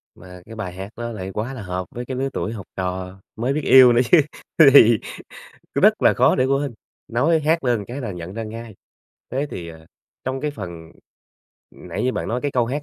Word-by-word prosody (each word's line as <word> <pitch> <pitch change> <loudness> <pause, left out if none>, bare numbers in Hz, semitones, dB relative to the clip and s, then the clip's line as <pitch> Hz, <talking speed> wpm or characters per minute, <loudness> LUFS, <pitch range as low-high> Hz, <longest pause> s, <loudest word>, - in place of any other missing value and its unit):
Mà 90 0 -13
cái 115 - -11
bài 100 -5 -5
hát 95 +2 -7
đó 120 0 -4
lại 95 -4 -6
quá 110 +7 -3
là 130 - -7
hợp 90 -1 -4
với 120 +1 -5
cái 130 0 -5
lứa 135 +1 -1
tuổi 110 - -3
học 100 -4 -8
trò, 95 0 -4 0.2
mới 120 +5 -1
biết 155 - -1
yêu 130 -2 +8
nữa 120 - +4
chứ, - - +8 0.4
th - - +6
thì 115 -5 +7 0.8
rất - - +7
là - - +6
khó - - +3
để 130 - +2
quên, 135 0 0 0.3
nói 150 +8 +2
hát 160 +2 +1
lên 120 -5 0
cái 130 +4 -6
là 115 - -4
nhận 90 0 -8
ra 115 +1 -4
ngay. 110 0 -8 0.6
Thế 135 +4 -1
thì, 85 -1 -7
ờ, 80 -1 -13 0.4
trong 130 +1 -3
cái 150 - -2
phần 85 - -9 0.8
nãy - - -6
như 130 - +1
bạn - - -4
nói 120 +2 -1
cái 145 - -2
câu 120 -2 +1
hát 140 +5 -3
115 Hz, 225 wpm, -21 LUFS, 95-130 Hz, 0.8 s, yêu